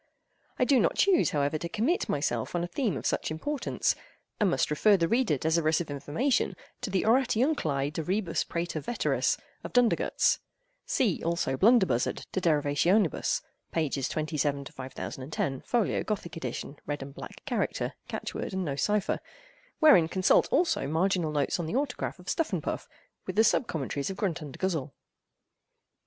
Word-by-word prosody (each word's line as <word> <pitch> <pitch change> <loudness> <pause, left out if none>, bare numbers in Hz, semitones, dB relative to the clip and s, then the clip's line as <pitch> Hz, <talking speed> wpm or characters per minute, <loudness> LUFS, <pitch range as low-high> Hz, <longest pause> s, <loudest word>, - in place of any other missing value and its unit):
I 250 - +3
do 270 -1 +4
not - - +2
choose, 390 -4 +4
however, 145 +1 0
to 170 - -4
commit 230 - 0
myself 140 -2 -1
on 175 - 0
a - - -2
theme 195 - -1
of - - -7
such - - 0
importance, 270 - -1 0.5
and 210 -3 +3
must 175 - +1
refer 200 +7 +5
the 165 -2 +1
reader 230 - +2
desirous 160 +2 +2
of 165 -4 -4
information 145 - 0 0.3
to 250 - -3
the 190 -1 +1
"Oratiunculae 225 - +2
de 160 - -2
Rebus 185 +1 0
Praeter 170 -1 -3
Veteris," 240 - 0 0.3
of - - -7
Dundergutz. 245 -2 +3 0.5
See, 225 - +1
also, 170 -5 0
Blunderbuzzard 190 - +3
"De 190 - -1
Derivationibus," 160 +4 +2 0.3
pp. 145 -5 -1
27 150 -2 -1
to - - -10
5010, 135 +1 -4
Folio, 235 -4 +1
Gothic 185 -5 -4
edit., 130 -7 -4 0.2
Red 145 -1 -3
and 135 0 -10
Black - - -10
character, - - -1
Catch - - -5
word - - -4
and 190 -1 -1
No 140 -3 -2
Cypher; 205 +7 0 0.6
wherein 295 - +6
consult, 185 +2 +3
also, 335 - +2
marginal 170 +2 +1
notes 145 +2 0
in 170 - -2
the 190 - -3
autograph 270 -6 -2
of 180 - -15
Stuffundpuff, 325 - -2 0.4
with 185 - -3
the 220 - +5
Sub 225 - +3
Commentaries 140 -1 -3
of 190 - -5
Gruntundguzzell. 160 - -2
170 Hz, 155 wpm, -29 LUFS, 145-215 Hz, 0.6 s, wherein